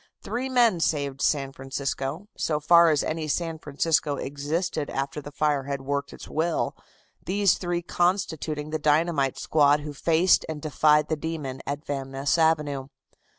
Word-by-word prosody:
Three 255 +2 -3
men 235 -8 +3
saved 140 -4 -1
San 135 -3 +1
Francisco, 135 +6 -4
so 150 -2 -1
far 170 +2 +6
as 150 -3 +2
any 155 0 -3
San 165 +1 -2
Francisco 150 0 0
existed 145 +3 -3
after 135 +2 -3
the 145 - -8
fire 145 -2 0
had 140 -1 -4
worked 140 +1 -2
its - - -11
will, 160 +1 -1 0.5
these 200 0 +3
three 175 -1 -2
constituting 160 -5 -1
the 155 - -1
dynamite 150 -2 +2
squad 145 -1 +3
who 150 0 -6
faced 165 +5 +3
and 155 -1 -4
defied 150 0 +3
the 155 - 0
demon 150 -4 -5
at 145 +2 -4
Van 135 -2 -4
Ness 135 +3 0
Avenue. 150 -4 +1
150 Hz, 155 wpm, -26 LUFS, 140-165 Hz, 0.5 s, far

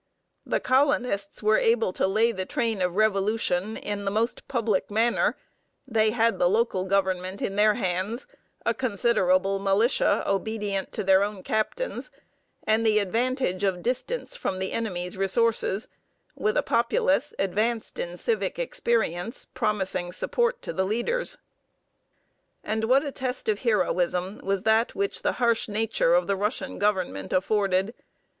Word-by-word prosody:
The - - +1
colonists 250 -7 +1
were 215 +1 +4
able 225 -4 +2
to - - +1
lay 220 +4 +2
the 190 -4 -4
train 225 -5 -1
of 180 -1 0
revolution 210 -1 +1
in 205 -1 -4
the 200 - 0
most 220 +4 -1
public 225 -6 0
manner, 225 +3 +1 0.5
they 220 -3 +2
had 230 0 +1
the 175 - +4
local 195 -3 +1
government 190 0 0
in 195 - -3
their 210 +1 +4
hands, 195 +3 -2 0.4
a 235 - +2
considerable 195 -5 +1
militia 200 +6 +2
obedient 200 -1 -2
to - - -2
their 190 0 +5
own 200 -2 -4
captains, 475 - -2 0.6
and 220 +1 +2
the 215 -1 +3
advantage 225 -1 0
of 185 -3 0
distance 340 - -2
from 195 - -3
the 190 0 -3
enemy's 180 -5 -3
resources, 210 +1 +2 0.5
with 425 +3 0
a - - +2
populace 265 +4 +1
advanced 215 +4 -1
in 175 +1 -4
civic 460 - -1
experience 230 - -1
promising 190 -7 -1
support 475 - 0
to - - -4
the 190 - 0
leaders. 240 - -1 1.3
And 220 +1 -1
what 265 +5 +3
a 285 - -3
test 255 -1 -4
of 210 -2 +1
heroism 185 -3 0
was 195 -1 -1
that 220 +1 +2
which 400 0 -2
the - - 0
harsh 235 -1 +1
nature 215 -5 +1
of 175 0 +3
the 200 - 0
Russian 210 +5 -3
Government 185 - -1
afforded! 195 +1 +1
215 Hz, 145 wpm, -26 LUFS, 190-235 Hz, 1.3 s, their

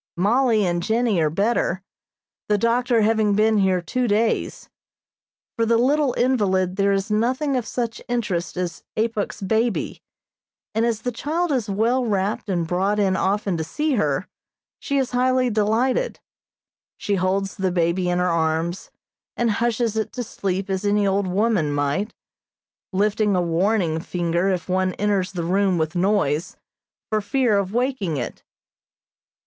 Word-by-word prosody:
Mollie 220 +2 +3
and 175 -1 0
Jennie 220 -1 +1
are 155 - +2
better, 195 +1 0 0.7
the 210 - +3
doctor 235 +2 +2
having 215 -1 +2
been 215 0 +3
here 190 -2 +2
two 250 +8 -1
days. 220 +2 0 0.9
For 230 - 0
the 230 0 +3
little 275 +2 +2
invalid 190 -8 +1
there 200 0 +2
is 195 +2 -1
nothing 255 +6 +1
of 245 -3 -2
such 235 -2 -3
interest 205 -9 -2
as 180 -1 -3
Apuk's 220 -2 -2
baby, 220 +3 0 0.7
and 225 +2 +1
as 225 -2 -2
the 245 - -1
child 315 +8 -2
is 245 -7 -1
well 230 +6 +1
wrapped 205 -2 -1
and 175 -3 0
brought 190 +4 0
in 195 -2 +2
often 195 -1 0
to 160 - -2
see 300 - -2
her, 155 - 0 0.5
she 280 - -2
is 265 -2 0
highly 255 0 +2
delighted. 225 - +1 0.8
She 205 - -2
holds 195 +1 0
the 190 -1 -1
baby 175 +1 +1
in 175 - +1
her 180 - +1
arms, 165 +1 -1 0.5
and 235 -2 +2
hushes 230 0 0
it 220 -1 -1
to 250 - -3
sleep 195 -3 -3
as 190 0 -2
any 205 0 +2
old 195 0 +1
woman 190 -5 +1
might, 145 +9 -1 0.8
lifting 205 +1 +1
a - - +2
warning 170 -1 +1
finger 175 +2 -1
if 180 -3 -2
one 185 0 0
enters 200 -2 0
the 175 -2 -3
room 190 +1 +2
with 155 0 -1
noise, 180 -4 0 0.5
for 215 0 +1
fear 235 +1 +1
of 195 -1 -3
waking 235 - -1
it. 120 - -5
205 Hz, 155 wpm, -22 LUFS, 185-230 Hz, 0.9 s, Mollie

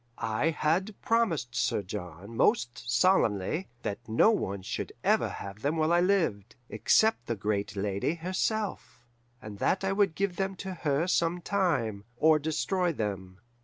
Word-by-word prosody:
I 110 +8 0
had 170 +6 0
promised 190 - +1
Sir 115 -4 0
John 90 +3 -7
most 120 +1 +1
solemnly 125 - +2 0.2
that 100 - -3
no 115 - +5
one 100 - -2
should - - -4
ever - - +3
have 100 +2 -8
them 145 +5 0
while 160 +1 +2
I 175 - +4
lived, 165 - 0
except 220 - +2
the 115 - -1
great 105 0 -2
lady 100 - -1
herself, 185 - -3 0.4
and 105 -3 -8
that 190 - +1
I 195 - +1
would 195 -4 +2
give 195 -2 -1
them 195 0 -1
to 190 0 -6
her 155 -2 0
some 175 -1 +1
time, 145 - 0
or 155 +3 +5
destroy 170 +4 0
them. 95 - -5
155 Hz, 155 wpm, -29 LUFS, -, 0.4 s, no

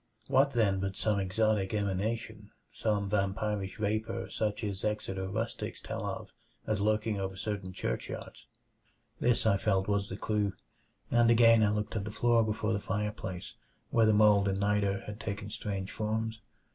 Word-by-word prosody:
What, 135 +1 +3
then, 105 -5 +2
but 95 0 -2
some 105 -2 +1
exotic 100 +1 +1
emanation; 105 +2 -2 0.2
some 105 -2 0
vampirish 100 -1 -1
vapor 110 +2 -2
such 105 0 -1
as 100 -2 -3
Exeter 95 -3 -2
rustics 110 +4 -3
tell - - -4
of - - -5 0.4
as 105 -2 0
lurking 105 0 +1
over 95 0 -3
certain 100 -2 -3
churchyards? - - -5 0.7
This 120 -2 +2
I 100 -3 +4
felt 95 -2 +1
was 100 -1 0
the 95 - -5
clue, 105 -3 0 0.6
and 120 -1 +5
again 115 -1 +7
I 105 - +4
looked 105 +1 -2
at 100 -2 -1
the - - -4
floor 120 0 +3
before 110 0 -1
the 100 - 0
fireplace 100 -3 -4 0.4
where 115 -2 +4
the - - +6
mold 105 -1 +5
and 95 0 0
niter 100 -1 +1
had 105 +1 -7
taken 105 0 -5
strange 100 -3 -3
forms. 110 +1 -2
105 Hz, 160 wpm, -31 LUFS, 100-110 Hz, 0.7 s, again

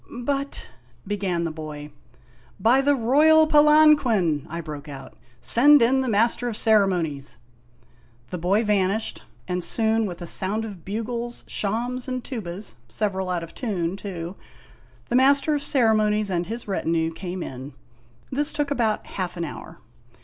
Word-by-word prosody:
" - - -23 0.2
But 280 0 -4 0.2
" - - -32
began 190 -4 -2
the 165 - -2
boy. 150 -1 -8 0.3
" 120 -1 -30
By 260 +3 +5
the 285 +1 +3
royal 300 +6 +5
Palanquin! 295 - +4
I 170 +1 -5
broke 150 -2 -8
out; 135 -1 -10
" 120 -1 -32
send 290 +5 +6
in 265 +3 +3
the 260 - -1
Master 230 +3 +2
of 220 - -4
Ceremonies! 175 - +1 0.4
' 120 0 -32
The 180 - -4
boy 195 +6 +2
vanished, 205 0 0 0.3
and 180 -1 -2
soon 225 +1 +1
with 175 -2 -7
a 175 - -6
sound 205 +6 -2
of 195 -6 -9
bugles, 235 +3 -4
shawms, 240 +5 -2
and 255 -1 -3
tubas 200 - -4 0.2
(several 190 - -2
out 175 -2 -1
ot 165 - -10
tune, 185 -8 -2
too), 185 -3 -6 0.7
the 240 - 0
Master 280 +4 +4
of 290 - -1
Ceremonies, 215 -6 +2
and 175 -1 -1
his 230 +1 -6
retinue, 165 -4 -1
came 180 +1 -5
in. 130 +2 -8 0.6
This 290 +3 +2
took 295 -1 -2
about 230 -6 0
half 180 -2 -5
an 170 - -2
hour. 150 - -9
205 Hz, 165 wpm, -24 LUFS, 170-245 Hz, 0.7 s, send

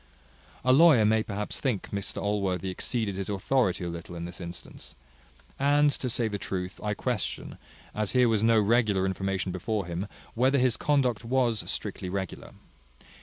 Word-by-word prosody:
A 130 - +6
lawyer 145 -6 +7
may 110 +1 +3
perhaps 105 -1 -4
think 125 -8 -2
Mr 100 -1 -3
Allworthy 95 -3 -1
exceeded 110 +1 -2
his 95 +1 -4
authority 100 -1 +1
a - - -2
little 85 +1 -7
in 85 0 -5
this 90 +1 -6
instance. 85 0 -8 0.6
And, 145 +1 +4
to 130 - -3
say 115 0 +1
the 105 -2 -4
truth, 90 -1 -4
I 105 -1 -1
question, 120 -2 -3 0.3
as 105 -2 -2
here 125 -1 +5
was 110 -3 +2
no 115 0 +5
regular 105 -3 +2
information 95 0 -1
before 100 +2 -2
him, 85 +3 -4 0.3
whether 130 +4 +3
his 125 -3 +3
conduct 135 -6 +1
was 120 -2 0
strictly 90 - -2
regular. 95 0 -5
105 Hz, 165 wpm, -28 LUFS, 95-125 Hz, 0.6 s, lawyer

